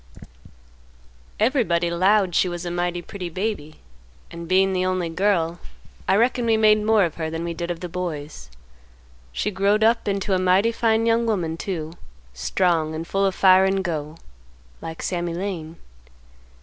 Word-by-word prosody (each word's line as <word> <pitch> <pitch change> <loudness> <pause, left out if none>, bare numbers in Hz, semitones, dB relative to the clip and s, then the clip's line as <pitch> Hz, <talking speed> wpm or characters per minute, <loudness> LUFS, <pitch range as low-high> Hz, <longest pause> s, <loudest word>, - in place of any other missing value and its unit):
"Everybody 210 - +1
'lowed 190 +1 +2
she 180 - +2
was 175 0 -5
a 175 - -3
mighty 175 0 -2
pretty 180 0 -7
baby, 175 -4 -4 0.5
and, 170 0 -8
bein' 190 +2 +3
the 185 0 0
only 185 -2 -1
girl, 170 -1 0 0.5
I 190 - +4
reckon 240 +2 +2
we 225 -1 +3
made 215 -1 +4
more 215 -1 +4
of 165 - -6
her 160 -1 -3
than 165 +1 -4
we 170 0 -3
did 170 +1 -5
of 170 -1 -4
the 180 - -4
boys. 160 - -6 0.8
She 210 - -2
growed 200 +2 +2
up 230 0 +2
into 200 0 -1
a 185 - +2
mighty 185 +5 +3
fine 225 -1 +1
young 230 0 +2
woman 175 -7 -1
too; 165 -3 -5 0.4
strong, 160 - 0
and 160 +1 -5
full 195 +2 +1
of 190 - -2
fire 190 0 +6
and 190 0 0
go, 155 -3 -4 0.6
like 165 0 -7
Sammy 175 -2 -2
Lane. 170 -4 -5
185 Hz, 165 wpm, -23 LUFS, 170-205 Hz, 0.8 s, fire